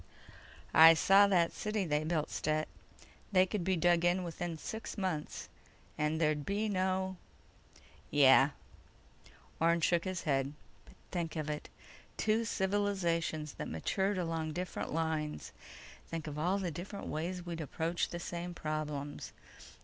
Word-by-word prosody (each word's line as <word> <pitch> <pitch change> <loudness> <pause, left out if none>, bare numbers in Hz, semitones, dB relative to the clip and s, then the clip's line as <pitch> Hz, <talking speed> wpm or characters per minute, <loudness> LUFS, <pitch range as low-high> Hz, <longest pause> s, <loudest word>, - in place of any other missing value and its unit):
"I 165 +1 +9
saw 195 +4 +6
that 175 -4 +3
city 210 -2 -2
they 150 -2 0
built, 155 -1 -1
Stet. 155 0 0 0.6
They 185 -2 +5
could 190 -1 -3
be 190 +1 +1
dug 175 0 +3
in 175 +1 +2
within 170 -1 -4
six 220 +9 -6
months, 180 -6 -3 0.5
and 150 +1 0
there'd 155 -2 +1
be 205 +6 -1
no—" 190 -1 0 0.9
"Yeah." 135 -1 +6 1.1
Orne 170 +1 +3
shook 170 +2 +2
his 185 -2 -3
head. 135 -1 0 0.3
"But - - -18 0.2
think 170 -3 -3
of 155 -1 -2
it: 150 - -6 0.5
Two 220 +1 +1
civilizations 190 - 0
that - - -3
matured 190 - -1
along 165 -3 -2
different 180 +2 -4
lines! 160 -1 -2 0.6
Think 165 -2 -5
of 150 -1 -5
all 180 +5 +1
the 185 -4 -2
different 190 +6 -7
ways 175 +3 -3
we'd 170 -1 -4
approach 165 +3 -1
the 175 - -5
same 175 0 -5
problems 150 -2 -4
170 Hz, 140 wpm, -33 LUFS, 155-185 Hz, 1.1 s, I